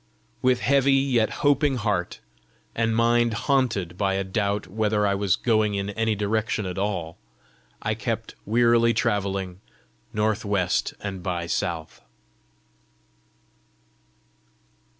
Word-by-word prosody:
With 125 -1 +2
heavy 140 0 +3
yet 130 -5 +2 0.2
hoping 145 -1 +3
heart, 105 -7 -2 0.5
and 115 -1 0
mind 120 0 +3
haunted 115 - 0
by 95 -2 +1
a 95 - 0
doubt 100 +1 -1
whether 105 0 0
I 100 - +2
was 100 -2 +1
going 110 -3 +1
in 100 +1 -2
any 110 +1 0
direction 105 0 -1
at 90 +1 -4
all, 90 -5 -3 0.6
I 105 - 0
kept 115 0 -4
wearily 115 +1 +3
travelling 100 -4 -1 0.5
"north 105 0 0
west 100 -4 0
and 95 -3 -5
by 85 -1 -2
south." 85 -1 -3
105 Hz, 115 wpm, -25 LUFS, 95-115 Hz, 0.6 s, heavy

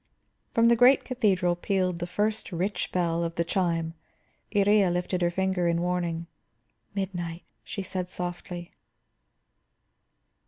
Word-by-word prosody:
From 230 0 +5
the 235 - +6
great 250 +3 +6
cathedral 195 -9 +2
pealed 185 -1 0
the 175 - -3
first 210 +4 -1
rich 180 +2 -2
bell 170 -2 +1
of 170 0 -3
the 170 - +1
chime. 170 -2 0 0.6
Iría 205 -2 +4
lifted 180 +1 -1
her 175 - +3
finger 190 0 0
in 170 0 +2
warning. 175 -1 -1 0.7
"Midnight," 175 -3 -3 0.2
she 200 - -5
said 185 -1 -3
softly. 175 -1 -5
180 Hz, 125 wpm, -27 LUFS, 175-195 Hz, 0.7 s, the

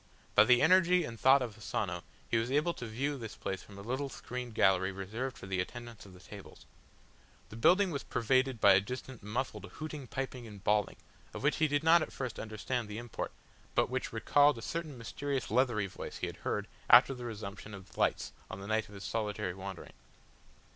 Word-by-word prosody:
By - - +7
the 125 +1 +5
energy 180 +1 +5
and 115 -6 -7
thought 135 0 +6
of 115 -4 -6
Asano 110 - -2 0.3
he 115 - +1
was 115 +2 0
able 150 +5 +2
to 125 - -7
view 135 +6 -2
this 115 -2 -7
place 95 -2 -4
from 100 - -13
a 100 - -8
little 130 +5 -2
screened 125 -3 -6
gallery 95 -1 +3
reserved 110 +7 -4
for - - -9
the 95 -1 -2
attendants 120 +1 -8
of 95 - -14
the 90 - -14
tables. 100 +1 -12 0.8
The - - -10
building 180 - +4
was 140 -3 -2
pervaded 130 +1 +1
by 100 -1 +7
a 95 - +5
distant 125 +3 -7
muffled 105 -1 -3
hooting, 155 -4 -6
piping 130 -1 -4
and 100 -2 -11
bawling, 105 -1 +2 0.4
of - - -6
which 150 - +2
he 155 - +3
did 145 0 0
not 165 +1 +6
at - - -3
first 130 -4 -5
understand 110 +2 -3
the 105 0 -6
import, 120 0 -5 0.4
but - - +2
which - - -2
recalled 145 -2 +4
a 115 - -8
certain 160 -3 -4
mysterious 135 +2 -3
leathery 120 -4 +2
voice 95 - -7
he - - -2
had - - -6
heard - - -2 0.2
after 125 +5 +8
the 125 -2 -7
resumption 105 -2 -7
of 95 -1 -13
the - - -13
lights - - +1 0.2
on - - -6
the 100 - -8
night 110 +1 0
of 105 - -12
his 100 - -8
solitary 105 -4 -2
wandering. 95 -1 -8
115 Hz, 210 wpm, -32 LUFS, 105-135 Hz, 0.8 s, after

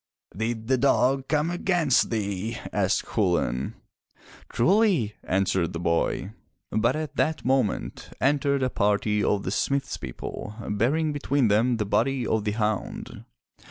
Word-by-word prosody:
"Did 110 +2 -2
the 130 +1 +2
dog 135 0 +2
come 150 +2 +1
against 175 -6 +2
thee?*' 105 0 -2 0.2
asked 100 0 +1
Chulain. 85 - 0 0.7
"Truly, 180 - +2
answered 95 -2 0
the 85 - -4
boy. 85 +3 0 0.4
But 115 +5 +2
at 155 -2 -5
that 155 0 0
moment, 130 -6 0
entered 140 0 +2
a 130 - 0
party 105 +1 +1
of 100 0 +1
the 95 - -3
smith's 135 +5 -1
people, 70 - -7 0.2
bearing 145 +9 +1
between 140 -4 +1
them 115 +4 +3
the 105 - -1
body 125 +5 +1
of 110 -1 0
the 105 - 0
hound. 105 -2 -3
115 Hz, 135 wpm, -26 LUFS, 105-140 Hz, 0.7 s, them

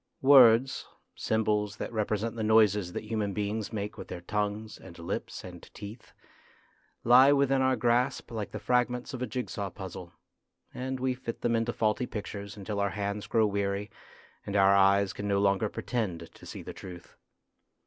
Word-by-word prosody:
Words 130 -2 +6 0.3
symbols 105 -2 0
that - - -5
represent 110 +1 -1
the 115 - -4
noises 105 -4 +3
that - - -4
human 105 -2 -2
beings 105 +2 -3
make 105 -2 -5
with - - -7
their 85 - -7
tongues 105 +3 -3
and 90 -2 -13
lips 85 0 -5
and - - -10
teeth 105 +4 -10 0.9
lie 130 +4 +7
within 140 -1 +3
our 130 0 +3
grasp 120 +2 0
like 110 -3 -4
the - - -6
fragments 125 0 0
of 130 - -5
a 125 - -1
jig 125 -1 -3
saw 100 -2 -4
puzzle, 90 -2 -8 0.6
and 130 +1 -4
we 130 0 0
fit 125 -2 -7
them 115 -1 +1
into 115 +1 0
faulty 110 +2 0
pictures 100 -1 -6
until 100 +1 -4
our 100 0 +1
hands 100 +2 -4
grow 110 -1 +3
weary 100 0 -2 0.5
and 100 - -5
our 100 0 +5
eyes 100 0 +4
can 100 - -5
no 100 -1 +2
longer 100 +1 +2
pretend 105 -10 -4
to - - -14
see - - -8
the - - -7
truth. 90 -2 -11
105 Hz, 175 wpm, -29 LUFS, 100-120 Hz, 0.9 s, lie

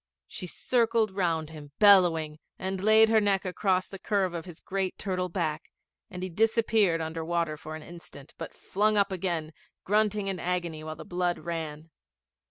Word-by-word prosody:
She 180 - -6
circled 230 +1 +1
round 165 -5 -1
him 145 -2 -11
bellowing, 170 -7 +5 0.2
and 190 0 -3
laid 220 +2 +6
her 220 -1 +4
neck 200 -2 +1
across 185 0 0
the 195 - -9
curve 195 -3 0
of 165 -2 -5
his 175 -3 -10
great 190 -1 -3
turtle 185 -2 -2
back, 160 -3 -3 0.4
and 180 0 -7
he 185 - -3
disappeared 215 -3 +2
under 160 0 -4
water 165 -2 -1
for 155 +1 -8
an 155 - -9
instant, 170 -5 -12
but - - -6
flung 210 +2 +1
up 200 0 +3
again, 170 -4 -2 0.3
grunting 210 0 +1
in 195 -2 -2
agony 175 -3 -2
while 155 0 -6
the - - -10
blood 175 -1 -1
ran. 160 -2 -5
180 Hz, 175 wpm, -28 LUFS, 160-200 Hz, 0.4 s, laid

